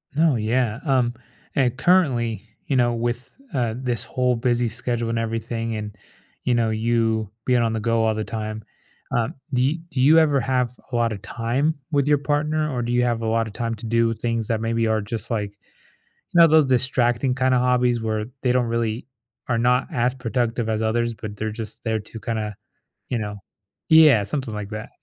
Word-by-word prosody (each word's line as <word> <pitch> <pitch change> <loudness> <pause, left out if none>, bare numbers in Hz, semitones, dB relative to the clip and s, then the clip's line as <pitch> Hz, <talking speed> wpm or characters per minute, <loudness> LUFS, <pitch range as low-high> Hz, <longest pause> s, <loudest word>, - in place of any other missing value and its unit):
No. 155 -3 +4
Yeah, 115 +1 0
um, 125 -4 +2 0.4
and 125 -3 +2
currently, 125 - +2 0.2
you 140 - 0
know, 120 -2 +3
with, 120 +1 -3 0.2
uh, 120 -4 0
this 125 -2 -2
whole 125 -1 0
busy 120 0 +1
schedule 120 0 -2
and 115 - 0
everything 115 0 -3
and, 105 -1 -5 0.5
you 125 - +1
know, 115 -1 +2
you 110 -1 0 0.2
being 125 -2 +3
on 115 -1 +1
the 110 - -1
go 115 0 +1
all 110 -1 +2
the 110 - -2
time, 110 -1 -5 0.5
um, 115 -1 0 0.2
do 125 - +2
you 140 +4 +2 0.2
do 130 - -1
you 155 +5 +6
ever 150 -3 +3
have 125 -1 0 0.2
a - - -2
lotta 115 -3 +1
time 125 +10 -1 0.2
with 140 -1 +2
your 145 -1 +4
partner 150 +2 0
or 120 - -1
do 120 +1 -2
you 125 0 +3
have 120 -2 0
a 115 - -2
lotta 115 0 0
time 115 +2 -3
to 110 +2 -10
do 115 0 +2
things 115 -1 -2
that 110 -1 -1
maybe 115 0 0
are 110 0 +1
just, 110 +1 -4
like, 105 -3 -1
you 100 - -34 0.6
know, 165 - +10
those 155 -2 +5
distracting 125 0 +1
kinda 130 0 +2
hobbies 125 -1 +2
where 110 -1 -2 0.2
they 125 - +2
don't 125 -1 +2
really 115 0 -2 0.4
are 115 - +1
not 125 +2 +2
as 125 +1 +1
productive 120 -2 -1
as 110 0 0
others, 115 +1 0
but 105 -2 -7
they're 110 +1 -2
just 110 -1 -7
there 110 -1 0
to 110 +2 -10
kinda, 110 -1 -3 0.6
you 125 - 0
know 105 -1 -4 0.5
Yeah, 155 -10 +7
something 130 -1 -3
like 105 -1 -5
that. 110 0 -6
115 Hz, 195 wpm, -23 LUFS, 110-125 Hz, 0.6 s, know